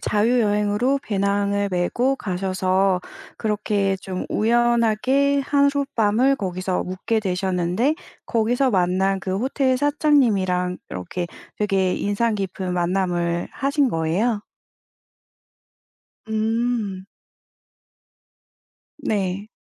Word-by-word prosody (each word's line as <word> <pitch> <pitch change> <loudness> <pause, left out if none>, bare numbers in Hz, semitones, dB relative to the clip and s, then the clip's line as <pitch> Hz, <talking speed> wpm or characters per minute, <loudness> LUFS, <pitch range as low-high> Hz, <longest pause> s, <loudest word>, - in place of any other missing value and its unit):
자유여행으로 215 +3 +2
배낭을 200 -1 0
메고 240 +9 +1
가셔서 185 -1 0 0.4
그렇게 205 -2 0
좀 185 -1 -5
우연하게 240 +4 +2
하룻밤을 275 -4 +2
거기서 185 -3 -2
묵게 185 +5 -1
되셨는데 190 - 0 0.3
거기서 245 +3 +1
만난 190 +1 +1
그 190 0 -2
호텔 260 +3 +1
사장님이랑 230 - +2
이렇게 170 - -4 0.3
되게 195 -3 +1
인상 215 +3 0
깊은 190 -2 -3
만남을 175 -1 0
하신 280 -1 +1
거예요? 190 +8 0 1.9
음. 220 -3 -1 1.9
네. 200 -6 -2
205 Hz, 205 characters per minute, -22 LUFS, 185-240 Hz, 1.9 s, 자유여행으로